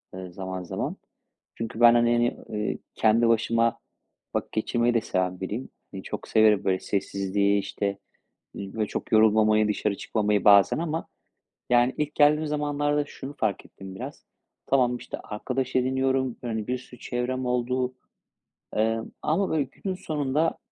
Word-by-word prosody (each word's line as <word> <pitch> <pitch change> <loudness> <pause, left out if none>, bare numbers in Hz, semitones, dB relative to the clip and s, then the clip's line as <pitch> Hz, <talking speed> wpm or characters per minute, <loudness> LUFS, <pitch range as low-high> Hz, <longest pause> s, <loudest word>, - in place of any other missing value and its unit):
ııı, 95 -1 -8
zaman 95 -1 -5
zaman. 90 - -4 0.6
Çünkü 115 0 -5
ben, 120 0 +8
hani, 120 0 +4
yani, 120 0 +2
eee, 105 -1 -2 0.2
kendi 115 +1 +3
başıma 115 0 +2 0.6
vakit - - -2
geçirmeyi 120 +2 +1
de 115 - +3
seven 90 -3 -2
biriyim. 105 +7 -4 0.2
Hani, 95 - -7
çok - - -6
severim, 110 -2 +4
böyle, 95 -1 +1
sessizliği, 100 0 0
işte, 100 0 -3 0.6
iii, 100 -1 -7
böyle, 110 -2 -1
çok - - -5
yorulmamayı, 110 0 +5
dışarı 105 -1 -1
çıkmamayı 105 -2 0
bazen 100 -1 +7
ama 165 -1 -3 0.6
yani, 120 +1 +4
ilk 150 0 -1
geldiğim 150 +1 +4
zamanlarda 145 0 0
şunu 140 +1 -9
fark 105 -4 -1
ettim 95 -1 -11
biraz. - - -8 0.4
Tamam, 125 -2 +3
işte, - - -7
arkadaş 130 +5 -3
ediniyorum. 130 0 +1
Hani, 110 -3 -3
bir 125 +1 -1
sürü 125 0 -14
çevrem 125 +1 -2
oldu. 125 +1 0 0.8
Emm, 115 +1 0
ama 190 +6 +1
böyle 155 -2 +1
günün 185 +7 -5
sonunda 150 -2 -1
115 Hz, 150 wpm, -26 LUFS, 105-130 Hz, 0.8 s, ben